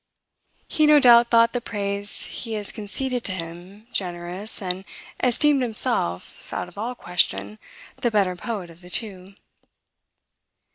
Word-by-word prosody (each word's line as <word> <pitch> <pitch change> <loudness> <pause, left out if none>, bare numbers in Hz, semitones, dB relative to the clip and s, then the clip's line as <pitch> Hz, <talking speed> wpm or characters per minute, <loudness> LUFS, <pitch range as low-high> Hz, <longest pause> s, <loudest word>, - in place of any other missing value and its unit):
He 310 -1 +3
no 300 -1 +8
doubt 240 -3 +7
thought 230 0 +5
the 245 - -1
praise 200 -2 -3
he 225 -2 -6
has 210 -2 -3
conceded 240 +5 -2
to - - +1
him 180 +4 -8
generous, 180 +3 -3
and 185 -1 -3 0.4
esteemed 275 +3 +4
himself, 225 - -2
out - - -3
of 180 - -13
all 230 +5 -3
question, 105 - -1 0.4
the 240 - +1
better 200 -5 +2
poet 185 -2 -5
of 165 +2 -15
the 180 - -13
two. 195 -2 -3
205 Hz, 140 wpm, -24 LUFS, 180-235 Hz, 0.4 s, no